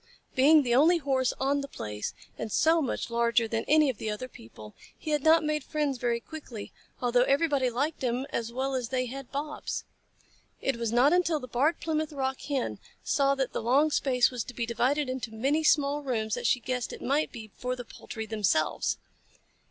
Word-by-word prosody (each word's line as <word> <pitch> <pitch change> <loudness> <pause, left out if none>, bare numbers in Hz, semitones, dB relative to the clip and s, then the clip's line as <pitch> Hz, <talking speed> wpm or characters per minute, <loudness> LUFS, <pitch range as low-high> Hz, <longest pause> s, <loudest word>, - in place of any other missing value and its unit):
Being 295 +3 +6
the 240 -2 0
only 315 +8 +5
Horse 265 -5 +1
on 280 +1 +1
the 280 - -5
place, 105 - -5 0.2
and 220 - -5
so 325 +7 +4
much 250 -3 -3
larger 235 0 +2
than 225 0 -1
any 305 0 +5
of 255 -6 -2
the 220 - -3
other 210 +4 -4
people, 110 - -13 0.2
he 310 - -5
had 300 -1 +2
not 320 +2 +5
made 300 -1 0
friends 295 -4 -1
very 235 -1 0
quickly, 240 -6 -9 0.3
although 245 0 +3
everybody 275 0 +2
liked 285 +6 -2
him 250 +1 0
as 230 0 -2
well 265 +2 -2
as 250 -3 -2
they 255 -1 0
had 265 +1 -8
Bobs. 295 +2 -4 0.8
It 270 -3 -1
was 230 -2 -2
not 255 +6 +5
until 345 -3 +2
the 255 - -8
Barred 280 +8 +1
Plymouth 310 -1 -2
Rock 265 -1 -2
Hen 275 -4 -2 0.2
saw 275 -1 +2
that 265 -2 -2
the - - -2
long 275 +7 +3
space 255 -4 +3
was 245 -3 -3
to 250 - -9
be 235 - -1
divided 250 +5 +1
into 255 -3 -4
many 280 +8 +1
small 290 -1 +3
rooms 225 -6 -2
that - - 0
she 250 - +3
guessed 250 0 -3
it - - -8
might 285 +4 +1
be 220 -3 -9
for 250 0 -3
the 245 -1 -8
poultry 220 0 -7
themselves. 205 -8 0
260 Hz, 200 wpm, -28 LUFS, 235-290 Hz, 0.8 s, Being